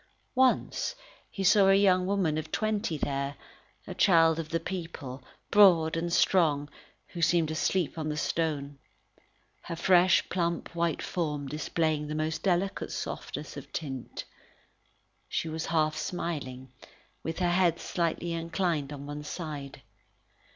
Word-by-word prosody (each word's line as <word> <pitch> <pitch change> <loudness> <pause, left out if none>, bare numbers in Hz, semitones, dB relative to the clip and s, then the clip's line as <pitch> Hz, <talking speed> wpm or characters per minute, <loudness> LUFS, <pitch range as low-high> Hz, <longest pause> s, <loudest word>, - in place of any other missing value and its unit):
Once 260 - +2 0.3
he 195 - -4
saw 195 0 +6
a 195 - +6
young 185 -2 +4
woman 190 -6 +1
of 155 - -4
twenty 215 -6 -1
there, 140 0 -2 0.5
a - - -6
child 165 -3 +4
of 160 -1 -4
the 165 - 0
people, 165 -7 -6 0.3
broad 175 -6 +6
and 170 +1 -2
strong, 155 -6 +3 0.4
who 170 - -6
seemed 165 -1 +3
asleep 170 +1 0
on 155 -1 -2
the 150 - -3
stone. 145 -3 -2 0.8
Her 170 - -6
fresh, 180 +1 +4
plump, 170 -1 -2
white 170 -2 -1
form 150 -5 -2
displayed 150 +1 -1
the 150 - -4
most 155 +1 -2
delicate 190 +1 0
softness - - -5
of - - -9
tint. 135 -6 -5 1.1
She - - -1
was 160 0 -4
half 155 -2 +1
smiling, 145 -6 -4 0.5
with 160 - -4
her 175 -1 +1
head 175 -2 +3
slightly 170 0 -2
inclined 165 -3 -1
on 140 -1 -7
one 145 +1 -6
side. 150 -3 -6
165 Hz, 135 wpm, -29 LUFS, 150-175 Hz, 1.1 s, saw